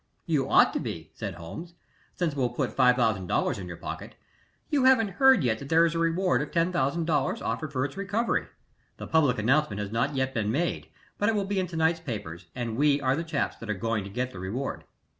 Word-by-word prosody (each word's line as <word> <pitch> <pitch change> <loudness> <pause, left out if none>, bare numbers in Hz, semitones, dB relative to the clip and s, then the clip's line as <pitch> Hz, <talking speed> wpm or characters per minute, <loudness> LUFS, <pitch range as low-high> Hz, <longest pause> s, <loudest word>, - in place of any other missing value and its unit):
"You 150 -5 0
ought - - +5
to - - -1
be," 80 -1 -6
said 100 -5 -5
Holmes, 160 - -9 0.4
"since 170 -4 -1
it - - -9
will 130 -3 +1
put 120 - -3
$5000 120 -10 +2
in 90 - -6
your 85 -1 -7
pocket. - - -7 0.6
You 280 -4 +3
haven't 240 -5 +5
heard 265 - +6
yet 110 -3 +1
that 140 - -8
there 165 +1 +5
is 165 - 0
a 165 - -1
reward 165 +2 +2
of 150 - -4
$10,000 165 -3 0
offered 130 +7 -2
for 130 -2 0
its 140 - -6
recovery. 200 +4 -1 0.5
The - - -7
public 145 -6 +3
announcement 115 -1 +1
has 105 -1 -4
not 135 +6 0
yet 130 0 0
been 105 -2 0
made, 170 +8 -1 0.3
but 205 - +2
it 225 - +1
will 200 -2 0
be 200 0 -1
in 185 - -1
to 170 - -8
night's 160 +1 +2
papers, 90 - -6
and 115 -3 -3
we 145 0 +3
are 130 -1 +1
the 165 - -2
chaps 165 -3 -2
that 115 - -9
are 105 - 0
going 115 +1 -1
to 100 - -8
get 125 +5 -3
the 90 - -9
reward." 110 +9 -4
140 Hz, 225 wpm, -27 LUFS, 115-165 Hz, 0.6 s, heard